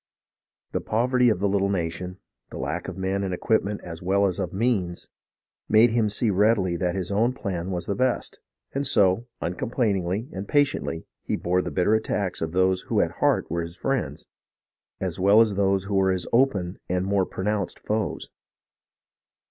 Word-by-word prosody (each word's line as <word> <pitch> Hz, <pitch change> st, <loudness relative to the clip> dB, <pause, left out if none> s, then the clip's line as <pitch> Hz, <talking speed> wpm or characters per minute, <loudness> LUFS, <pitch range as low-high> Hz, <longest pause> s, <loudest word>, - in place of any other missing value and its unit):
The -, -, -1 dB
poverty 125 Hz, +2 st, +2 dB
of 110 Hz, -, +2 dB
the 100 Hz, +3 st, 0 dB
little 100 Hz, 0 st, +1 dB
nation, 90 Hz, 0 st, -3 dB, 0.3 s
the -, -, -8 dB
lack 75 Hz, +7 st, -3 dB
of -, -, -6 dB
men 95 Hz, +1 st, -1 dB
and 95 Hz, -2 st, -1 dB
equipments 105 Hz, +1 st, 0 dB
as 85 Hz, -1 st, -8 dB
well 100 Hz, +3 st, +2 dB
as 95 Hz, -3 st, -1 dB
of -, -, -2 dB
means, 95 Hz, -5 st, -1 dB, 0.6 s
made 110 Hz, +2 st, +6 dB
him 115 Hz, -2 st, +2 dB
see 105 Hz, +1 st, +1 dB
readily 100 Hz, -2 st, +2 dB
that 90 Hz, 0 st, -1 dB
his 95 Hz, 0 st, -3 dB
own 115 Hz, +5 st, +2 dB
plan 95 Hz, -7 st, -4 dB
was 90 Hz, -2 st, -3 dB
best, 125 Hz, +5 st, -1 dB, 0.3 s
and 140 Hz, 0 st, 0 dB
so, 105 Hz, -1 st, +3 dB
uncomplainingly 100 Hz, +2 st, -1 dB
and 95 Hz, +1 st, -5 dB
patiently, 140 Hz, -, 0 dB, 0.2 s
he -, -, -2 dB
bore 90 Hz, +1 st, +1 dB
the -, -, -4 dB
bitter 95 Hz, +3 st, +2 dB
attacks 105 Hz, -3 st, -1 dB
of 80 Hz, -1 st, -2 dB
those 95 Hz, +1 st, +2 dB
who -, -, +2 dB
at -, -, +2 dB
heart -, -, +3 dB
were 85 Hz, 0 st, 0 dB
his 85 Hz, +1 st, -6 dB
friends, 135 Hz, -3 st, -2 dB, 0.7 s
as -, -, -3 dB
well 100 Hz, +3 st, +6 dB
as 110 Hz, -2 st, +4 dB
those 95 Hz, -1 st, +1 dB
who 100 Hz, 0 st, -5 dB
were 95 Hz, -1 st, +3 dB
his 90 Hz, -2 st, -1 dB
open 105 Hz, -8 st, +2 dB
and 90 Hz, +1 st, 0 dB
more 95 Hz, -1 st, +1 dB
pronounced 100 Hz, 0 st, -2 dB
foes. 105 Hz, -2 st, -3 dB
100 Hz, 175 wpm, -25 LUFS, 90-110 Hz, 0.7 s, made